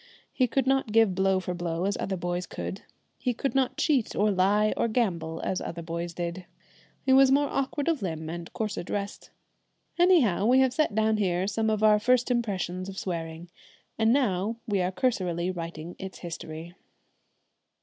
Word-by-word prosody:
He 255 Hz, -, +2 dB
could 265 Hz, +2 st, 0 dB
not 270 Hz, -4 st, +1 dB
give 225 Hz, -3 st, +4 dB
blow 190 Hz, 0 st, +2 dB
for 180 Hz, -1 st, -4 dB
blow 175 Hz, 0 st, -2 dB
as 200 Hz, -, 0 dB
other 190 Hz, -1 st, -2 dB
boys 175 Hz, 0 st, -3 dB
could; 195 Hz, -, -6 dB, 0.4 s
he 250 Hz, -3 st, -1 dB
could 275 Hz, -, -2 dB
not 270 Hz, -2 st, +1 dB
cheat 275 Hz, -8 st, +1 dB
or 210 Hz, +1 st, +3 dB
lie 205 Hz, +3 st, +3 dB
or -, -, +1 dB
gamble 170 Hz, -9 st, -1 dB
as 185 Hz, -, -1 dB
other 170 Hz, 0 st, -5 dB
boys 170 Hz, +1 st, -4 dB
did. 175 Hz, +1 st, -4 dB, 0.6 s
He 265 Hz, -, +4 dB
was 270 Hz, 0 st, +7 dB
more 285 Hz, +1 st, +4 dB
awkward 275 Hz, +2 st, -2 dB
of 330 Hz, -6 st, +1 dB
limb 160 Hz, -4 st, -4 dB
and 170 Hz, +1 st, -6 dB
coarser 215 Hz, -2 st, -3 dB
dressed. 200 Hz, +3 st, -5 dB, 0.7 s
Anyhow, 285 Hz, -, +4 dB
we 255 Hz, +2 st, +5 dB
have 260 Hz, -1 st, +4 dB
set 280 Hz, -8 st, +1 dB
down 220 Hz, 0 st, +2 dB
here 185 Hz, -3 st, +1 dB
some 220 Hz, +2 st, 0 dB
of 215 Hz, 0 st, 0 dB
our 210 Hz, -1 st, +6 dB
first 250 Hz, +3 st, +2 dB
impressions 190 Hz, -6 st, -2 dB
of 195 Hz, -, -8 dB
swearing, 165 Hz, -2 st, -5 dB, 0.4 s
and 225 Hz, 0 st, +3 dB
now 225 Hz, -4 st, +1 dB
we 205 Hz, -5 st, 0 dB
are 180 Hz, +1 st, 0 dB
cursorily 185 Hz, -5 st, 0 dB
writing 170 Hz, -1 st, -6 dB
its 190 Hz, -1 st, -7 dB
history. 165 Hz, 0 st, -7 dB
195 Hz, 180 wpm, -27 LUFS, 175-235 Hz, 0.7 s, was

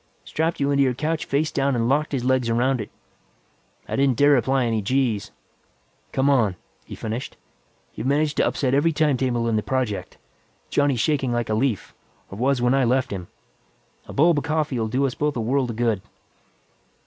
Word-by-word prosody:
"Strapped 160 Hz, +2 st, -1 dB
you 140 Hz, 0 st, +1 dB
into 140 Hz, 0 st, +3 dB
your 130 Hz, -2 st, +2 dB
couch 155 Hz, +4 st, -2 dB
face 150 Hz, +3 st, 0 dB
down 140 Hz, -1 st, +1 dB
and 115 Hz, -1 st, 0 dB
locked 145 Hz, +4 st, +1 dB
his 135 Hz, -4 st, -2 dB
legs 130 Hz, -2 st, +2 dB
around 125 Hz, +2 st, +1 dB
it. 105 Hz, -, -7 dB, 1.0 s
I -, -, -3 dB
didn't 135 Hz, -3 st, +2 dB
dare 145 Hz, 0 st, +5 dB
apply 130 Hz, +1 st, +1 dB
any 115 Hz, -2 st, 0 dB
g's. 120 Hz, -2 st, 0 dB, 0.8 s
Come 135 Hz, +1 st, +1 dB
on," 120 Hz, -9 st, +3 dB, 0.3 s
he -, -, -8 dB
finished, 115 Hz, +3 st, -5 dB, 0.6 s
"you've 115 Hz, -, -4 dB
managed 145 Hz, +2 st, +1 dB
to -, -, +3 dB
upset 130 Hz, -2 st, 0 dB
every 155 Hz, +4 st, +3 dB
timetable 130 Hz, -6 st, +1 dB
in 115 Hz, -1 st, +1 dB
the -, -, +1 dB
project. 125 Hz, -4 st, -3 dB, 0.5 s
Johnny's 145 Hz, -4 st, +2 dB
shaking 135 Hz, -2 st, +1 dB
like 120 Hz, -2 st, -1 dB
a -, -, +1 dB
leaf, 110 Hz, -1 st, -1 dB, 0.4 s
or 100 Hz, -, -8 dB
was 130 Hz, 0 st, +1 dB
when 125 Hz, +1 st, +3 dB
I 135 Hz, 0 st, +3 dB
left 130 Hz, +2 st, +1 dB
him. 90 Hz, -3 st, -5 dB, 0.8 s
A -, -, -8 dB
bulb 160 Hz, +1 st, +4 dB
of -, -, -7 dB
coffee 155 Hz, -5 st, -1 dB
will 110 Hz, -, 0 dB
do 130 Hz, +5 st, 0 dB
us 130 Hz, -, -1 dB
both 150 Hz, +2 st, -1 dB
a -, -, -2 dB
world 125 Hz, +3 st, 0 dB
of 115 Hz, -, -4 dB
good." 115 Hz, -4 st, 0 dB
130 Hz, 195 wpm, -23 LUFS, 115-140 Hz, 1.0 s, dare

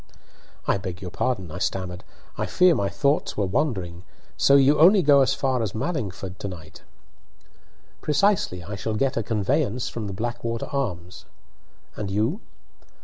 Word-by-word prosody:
"I -, -, +1 dB
beg 90 Hz, -2 st, -6 dB
your 90 Hz, -3 st, -7 dB
pardon," 95 Hz, -6 st, -2 dB
I 90 Hz, -, -6 dB
stammered. 90 Hz, -1 st, -3 dB, 0.3 s
"I -, -, -2 dB
fear 180 Hz, -1 st, +4 dB
my 100 Hz, -9 st, 0 dB
thoughts 140 Hz, +9 st, 0 dB
were 105 Hz, -, +1 dB
wandering. 95 Hz, -, -2 dB, 0.3 s
So 140 Hz, -, +4 dB
you 140 Hz, +2 st, +5 dB
only 185 Hz, +4 st, +7 dB
go 140 Hz, -2 st, +6 dB
as 135 Hz, -, +2 dB
far 130 Hz, -3 st, 0 dB
as 110 Hz, -3 st, -3 dB
Mallingford 100 Hz, -, -4 dB
to -, -, -4 dB
night?" 90 Hz, -5 st, -10 dB, 1.2 s
"Precisely. 150 Hz, -, +1 dB
I 100 Hz, +5 st, -7 dB
shall 110 Hz, +3 st, -3 dB
get 135 Hz, +4 st, 0 dB
a 115 Hz, -, 0 dB
conveyance 120 Hz, +3 st, 0 dB
from 110 Hz, -3 st, -5 dB
the 100 Hz, -, -5 dB
'Blackwater 115 Hz, +2 st, -3 dB
Arms.' 90 Hz, -11 st, -4 dB, 0.7 s
And 105 Hz, -2 st, -4 dB
you?" 110 Hz, -, 0 dB
110 Hz, 155 wpm, -24 LUFS, 95-140 Hz, 1.2 s, only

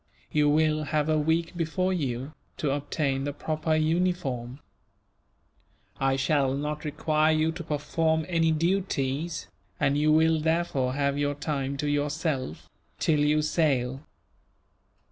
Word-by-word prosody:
You 150 Hz, -1 st, +3 dB
will 155 Hz, 0 st, +2 dB
have 150 Hz, 0 st, 0 dB
a 155 Hz, 0 st, +3 dB
week 165 Hz, +3 st, 0 dB
before 180 Hz, +3 st, 0 dB
you, 135 Hz, -3 st, -3 dB, 0.2 s
to 145 Hz, -, 0 dB
obtain 140 Hz, -1 st, -1 dB
the 145 Hz, -, -2 dB
proper 155 Hz, +2 st, -1 dB
uniform. 155 Hz, -6 st, 0 dB, 1.4 s
I 135 Hz, 0 st, +2 dB
shall 135 Hz, 0 st, +1 dB
not 150 Hz, +2 st, -3 dB
require 155 Hz, +1 st, +1 dB
you 155 Hz, +1 st, +2 dB
to 170 Hz, +1 st, -7 dB
perform 160 Hz, +1 st, 0 dB
any 165 Hz, -2 st, +2 dB
duties, 165 Hz, -2 st, -1 dB, 0.3 s
and 135 Hz, -, +2 dB
you 155 Hz, +1 st, +3 dB
will 160 Hz, +1 st, +4 dB
therefore 160 Hz, -5 st, 0 dB
have 140 Hz, 0 st, 0 dB
your 145 Hz, 0 st, 0 dB
time 140 Hz, -2 st, -2 dB
to 150 Hz, +1 st, -2 dB
yourself, 145 Hz, -1 st, -2 dB, 0.3 s
till 155 Hz, -2 st, +2 dB
you 150 Hz, +1 st, +3 dB
sail. 135 Hz, -5 st, +1 dB
150 Hz, 130 wpm, -27 LUFS, 140-160 Hz, 1.4 s, will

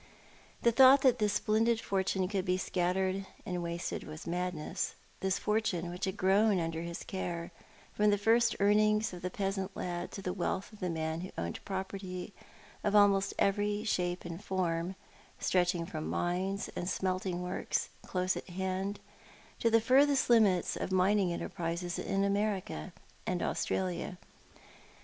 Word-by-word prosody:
The 235 Hz, -, +5 dB
thought 265 Hz, +3 st, +7 dB
that 260 Hz, -3 st, +4 dB
this 210 Hz, -1 st, +2 dB
splendid 220 Hz, +2 st, +2 dB
fortune 190 Hz, -2 st, 0 dB
could 195 Hz, -1 st, -1 dB
be 180 Hz, 0 st, +1 dB
scattered 185 Hz, +1 st, 0 dB, 0.2 s
and 180 Hz, -1 st, -2 dB
wasted 170 Hz, 0 st, -3 dB
was 155 Hz, +1 st, -9 dB
madness 180 Hz, 0 st, -2 dB
— -, -, -31 dB
this 190 Hz, 0 st, 0 dB
fortune 205 Hz, -5 st, 0 dB
which 180 Hz, +3 st, -3 dB
had 190 Hz, +2 st, -3 dB
grown 200 Hz, +1 st, +4 dB
under 165 Hz, -1 st, -2 dB
his 170 Hz, 0 st, -5 dB
care, 175 Hz, -3 st, -4 dB, 0.4 s
from 210 Hz, 0 st, +3 dB
the 205 Hz, -, +3 dB
first 230 Hz, +3 st, +3 dB
earnings 215 Hz, +1 st, +3 dB
of 175 Hz, -, -8 dB
the 180 Hz, -, -2 dB
peasant 195 Hz, 0 st, -3 dB
lad 175 Hz, -1 st, -3 dB
to 195 Hz, -, -6 dB
the 180 Hz, -, -2 dB
wealth 190 Hz, +3 st, -2 dB
of 210 Hz, -, -13 dB
the 180 Hz, -, -2 dB
man 160 Hz, 0 st, -2 dB
who 185 Hz, -, -6 dB
owned 85 Hz, 0 st, -4 dB
property 190 Hz, 0 st, -5 dB, 0.5 s
of 205 Hz, 0 st, +1 dB
almost 200 Hz, -1 st, +4 dB
every 205 Hz, +1 st, +1 dB
shape 180 Hz, -5 st, -1 dB
and 170 Hz, +3 st, -6 dB
form, 180 Hz, -1 st, -1 dB, 0.4 s
stretching 175 Hz, -2 st, +1 dB
from 155 Hz, -3 st, -5 dB
mines 190 Hz, +3 st, -1 dB
and 175 Hz, -, -2 dB
smelting 185 Hz, -1 st, -1 dB
works 180 Hz, +1 st, -2 dB
close 185 Hz, 0 st, 0 dB
at -, -, -7 dB
hand 190 Hz, +2 st, -2 dB, 0.6 s
to 230 Hz, -, +3 dB
the 225 Hz, 0 st, +5 dB
furthest 270 Hz, +3 st, +4 dB
limits 205 Hz, -7 st, +4 dB
of -, -, -3 dB
mining 190 Hz, 0 st, +3 dB
enterprise 170 Hz, +1 st, -3 dB
in 195 Hz, 0 st, 0 dB
America 200 Hz, -, -1 dB, 0.4 s
and -, -, 0 dB
Australia. 95 Hz, -2 st, -2 dB
190 Hz, 155 wpm, -32 LUFS, 175-205 Hz, 0.6 s, thought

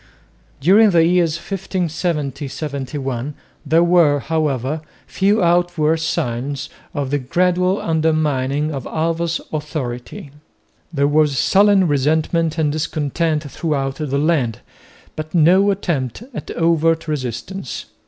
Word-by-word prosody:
During 200 Hz, +9 st, +5 dB
the 170 Hz, -3 st, +4 dB
years 170 Hz, -2 st, +2 dB
1570 170 Hz, -6 st, -3 dB
71 135 Hz, -2 st, -4 dB, 0.3 s
there 165 Hz, +3 st, +3 dB
were 170 Hz, -5 st, +4 dB
however 150 Hz, -1 st, -1 dB, 0.2 s
few 200 Hz, +1 st, +1 dB
outward 170 Hz, -2 st, +2 dB
signs 135 Hz, -2 st, -2 dB, 0.2 s
of 140 Hz, -2 st, -2 dB
the 145 Hz, -, +1 dB
gradual 180 Hz, +7 st, +1 dB
undermining 155 Hz, -3 st, 0 dB
of 135 Hz, -3 st, -5 dB
Alva's 165 Hz, +1 st, -1 dB
authority. 150 Hz, +1 st, -5 dB, 0.6 s
There 140 Hz, -3 st, +1 dB
was 150 Hz, -2 st, +2 dB
sullen 195 Hz, -, +4 dB
resentment 155 Hz, +3 st, +1 dB
and 155 Hz, -2 st, +1 dB
discontent 155 Hz, +1 st, -1 dB
throughout 140 Hz, -5 st, -2 dB
the 145 Hz, -3 st, -2 dB
land, 140 Hz, -7 st, 0 dB, 0.5 s
but 155 Hz, +2 st, -6 dB
no 180 Hz, +5 st, +5 dB
attempt 170 Hz, -, -2 dB
at -, -, -7 dB
overt 165 Hz, -1 st, +2 dB
resistance. 135 Hz, -, -4 dB
155 Hz, 110 wpm, -19 LUFS, 140-170 Hz, 0.6 s, During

